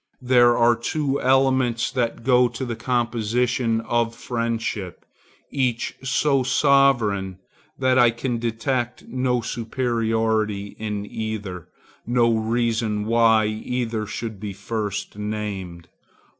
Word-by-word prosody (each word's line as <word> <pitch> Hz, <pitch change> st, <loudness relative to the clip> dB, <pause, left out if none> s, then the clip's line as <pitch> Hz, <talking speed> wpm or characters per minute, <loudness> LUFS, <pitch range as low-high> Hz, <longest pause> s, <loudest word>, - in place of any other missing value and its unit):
There 120 Hz, -1 st, +5 dB
are 120 Hz, 0 st, +4 dB
two 140 Hz, +4 st, -2 dB
elements 130 Hz, -3 st, +2 dB
that 120 Hz, -3 st, -2 dB
go 125 Hz, -1 st, +4 dB
to 130 Hz, -, -5 dB
the 120 Hz, -2 st, -4 dB
composition 120 Hz, -1 st, 0 dB
of 115 Hz, 0 st, -1 dB
friendship, 115 Hz, -6 st, -3 dB, 0.5 s
each 125 Hz, -4 st, -1 dB
so 135 Hz, +1 st, +2 dB
sovereign 125 Hz, -8 st, +2 dB, 0.4 s
that 130 Hz, -1 st, +3 dB
I 120 Hz, -, +6 dB
can 120 Hz, +1 st, -3 dB
detect 120 Hz, +2 st, -2 dB
no 125 Hz, -1 st, 0 dB
superiority 110 Hz, -3 st, -1 dB
in 105 Hz, -2 st, -3 dB
either, 105 Hz, -5 st, -5 dB, 0.4 s
no 120 Hz, -1 st, +3 dB
reason 110 Hz, -1 st, 0 dB
why 115 Hz, -1 st, +4 dB
either 110 Hz, 0 st, -3 dB
should 110 Hz, 0 st, -5 dB
be 100 Hz, -1 st, -5 dB
first 105 Hz, 0 st, -4 dB
named. 100 Hz, -5 st, -5 dB
115 Hz, 110 wpm, -23 LUFS, 110-125 Hz, 0.5 s, I